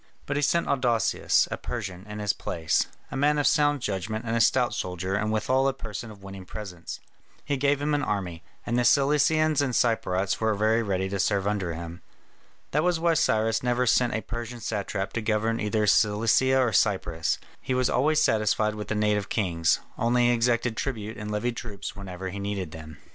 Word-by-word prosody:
But 145 - -3
he 145 - +1
sent 170 +4 +2
Adousius, 120 -5 +2
a - - -2
Persian, 100 -5 -6
in 105 - -6
his 105 -1 0
place, 80 -2 -1 0.2
a - - -5
man 145 +2 +2
of 145 - +1
sound 145 -3 +3
judgment 105 +3 -3
and 115 0 -1
a 115 - +2
stout 125 +2 +3
soldier 90 +1 -3
and 110 +2 0
withal 130 +5 +1
a 135 - +1
person 115 -2 -7
of 100 -2 -13
winning 95 -1 -8
presence. 90 -3 -8 0.5
He 145 - 0
gave 140 +1 +1
him 145 +1 -1
an 145 - +1
army; 95 - -3 0.2
and 120 +1 0
the - - +2
Cilicians 150 +3 +3
and 130 -4 -1
Cypriotes 100 -6 +1
were 110 -1 +2
very 110 +3 +2
ready 95 -3 -1
to 100 0 -3
serve 100 0 +1
under 100 -5 -1
him. 85 +1 -8 0.7
That 150 - +2
was 175 -2 +1
why 170 0 +3
Cyrus 110 -8 +2
never 125 0 +1
sent 125 -1 +2
a 110 - -1
Persian 120 +1 -6
satrap 100 -2 -3
to 115 - -2
govern 110 +1 0
either 105 0 0
Cilicia 115 +5 +3
or 125 -4 +2
Cyprus; 95 -6 +1 0.2
he 130 - -2
was 130 -1 +2
always 150 +4 +2
satisfied 110 -4 +2
with 105 -1 -6
the 105 - -2
native 105 -1 +1
kings; 85 -6 +1 0.2
only 120 +1 +3
he - - +4
exacted 120 0 +1
tribute 110 -5 -3
and 105 -1 -6
levied 115 +3 -2
troops 100 -4 -6
whenever 95 -2 -6
he 100 - -6
needed 100 -4 -3
them. 80 -1 -10
110 Hz, 195 wpm, -26 LUFS, 100-125 Hz, 0.7 s, he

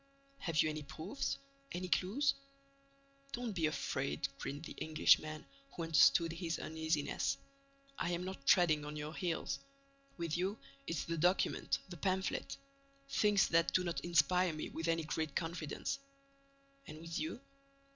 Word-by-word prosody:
"Have 165 -3 +2
you - - +1
any 155 0 -4
proofs? 160 - -3 0.3
Any 180 +1 -3
clues?" 210 +11 +2 1.0
"Don't 240 -1 -2
be 165 -4 +2
afraid," 140 -2 -1
grinned 145 +3 -4
the - - -7
Englishman, 155 0 +3 0.3
who 170 - -3
understood 165 +1 +5
his 165 0 -2
uneasiness. 160 -3 0 0.6
"I - - 0
am 175 +1 -1
not 185 -7 -6
treading 155 -5 +5
on 150 +1 -5
your 150 +1 -4
heels. 175 -2 -2 0.6
With 170 -3 -1
you, 190 +4 0 0.3
it's 165 - -1
the 165 -1 -3
document, 180 +4 +2
the 175 - -7
pamphlet: 190 +3 -1 0.5
things 210 -6 +4
that 165 0 +3
do 185 - +4
not 170 -1 -1
inspire 175 +1 +3
me 155 - -4
with 165 +1 -4
any 165 0 +2
great 155 -2 -2
confidence." 165 - -2 0.9
"And 155 - -8
with 165 +1 -4
you?" 315 -6 -3
165 Hz, 145 wpm, -36 LUFS, 155-180 Hz, 1.0 s, understood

